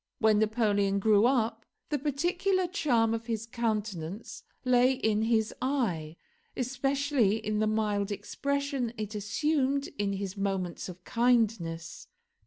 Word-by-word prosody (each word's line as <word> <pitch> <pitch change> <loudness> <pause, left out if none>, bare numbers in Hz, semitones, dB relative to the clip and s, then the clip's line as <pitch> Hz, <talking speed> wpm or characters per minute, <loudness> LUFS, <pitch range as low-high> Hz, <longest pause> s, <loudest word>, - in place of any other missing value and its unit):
When 215 -1 +4
Napoleon 210 -3 +2
grew 210 +2 +4
up, 240 -3 +1 0.3
the 295 -2 0
peculiar 355 +7 0
charm 265 - +1
of 230 0 -4
his 225 -1 -2
countenance 215 -5 -3 0.2
lay 250 +1 +4
in 220 -5 +1
his 220 -1 +1
eye, 195 - -1 0.4
especially 265 -3 +1
in 215 -1 -2
the 215 - +2
mild 210 -2 0
expression 280 +2 -2
it 215 0 -4
assumed 275 +6 0
in 200 -1 0
his 195 0 -4
moments 195 -3 -2
of 180 0 -10
kindness. 225 -10 0
225 Hz, 125 wpm, -29 LUFS, 205-265 Hz, 0.4 s, When